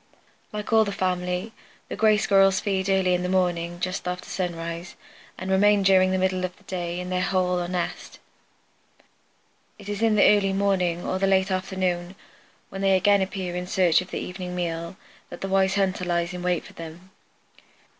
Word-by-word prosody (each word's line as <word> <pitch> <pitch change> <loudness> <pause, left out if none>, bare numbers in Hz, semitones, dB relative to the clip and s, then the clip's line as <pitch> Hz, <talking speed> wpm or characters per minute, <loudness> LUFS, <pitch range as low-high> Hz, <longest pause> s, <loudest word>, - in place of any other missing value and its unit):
Like 210 +1 -4
all 220 0 +6
the 205 - -3
family, 180 +2 -2 0.3
the - - -5
Gray 215 -1 +4
Squirrels 195 0 +4
feed 195 -1 -1
in 190 0 +3
the 180 - +3
early 180 0 -2
morning 175 -2 0
just 185 0 -3
after 180 0 -4
sunrise 170 -1 -4 0.4
and 190 0 -4
remain 205 +1 +4
during 190 -1 +5
the 190 - +1
middle 185 0 0
of 185 +1 -4
the 205 - -23
day 175 -2 -4
in 180 0 -5
their 180 0 0
hole 180 -1 +1
or 175 - -3
nest. 180 -1 -4 1.6
It 205 - -13
is 205 +1 -4
in 225 -1 +3
the 210 - +5
early 195 -1 0
morning 185 -3 0
or 185 - -1
the 195 - +2
late 190 0 +2
afternoon, 185 -1 -2 0.5
when 195 - -6
they 195 -1 +4
again 200 +1 +3
appear 185 -2 -3
in 180 0 -4
search 180 -2 +3
of 185 - -10
the - - -4
evening 180 -1 -6
meal, 170 -1 -3 0.3
that 175 - -10
the 195 - -2
wise 190 0 +2
hunter 190 -2 0
lies 170 0 -1
in 180 - -6
wait 180 -1 -1
for - - -13
them. 165 +3 -10
185 Hz, 190 wpm, -25 LUFS, 180-195 Hz, 1.6 s, all